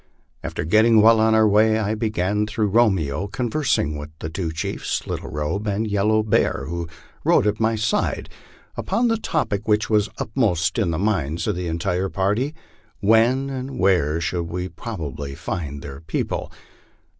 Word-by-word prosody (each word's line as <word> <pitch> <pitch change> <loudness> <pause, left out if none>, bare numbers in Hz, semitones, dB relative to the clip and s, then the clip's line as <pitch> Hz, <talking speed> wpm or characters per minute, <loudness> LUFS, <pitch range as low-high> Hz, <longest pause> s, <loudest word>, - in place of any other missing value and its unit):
After - - -4
getting 110 +6 +5
well 110 +1 +6
on 110 0 +4
our 110 - +5
w:iy 110 +1 +4
I 105 0 0
began, 105 -2 0
through 105 -1 0
Romeo, 95 -7 +2
conversing 120 - 0
with 75 +1 -7
the 80 0 -6
two 85 -1 -3
chiefs 80 - -3
Little - - -5
Robe 75 +8 -3
and 105 +2 0
Yellow 105 +1 +2
Bear, 100 -9 +1
who 85 0 -4 0.4
rode - - +4
at 105 0 0
my 110 0 +2
side, 110 0 -1 0.5
upon 240 +1 0
the 225 - +2
topic 150 - -2
which 105 +1 +1
was 105 -1 +3
uppermost 105 - 0
in - - +1
the 80 - -1
minds 85 -5 -1
of - - 0
the 90 0 -3
entire 90 +3 -1
party: 105 +12 0 0.4
When 115 +6 +3
and 130 0 -5
where 85 -5 +2
should 85 +1 -2
we 90 +2 -4
probably 75 - -6
find 75 - -5
their 70 -1 -8
people? 80 - -3
100 Hz, 165 wpm, -22 LUFS, 85-110 Hz, 0.5 s, well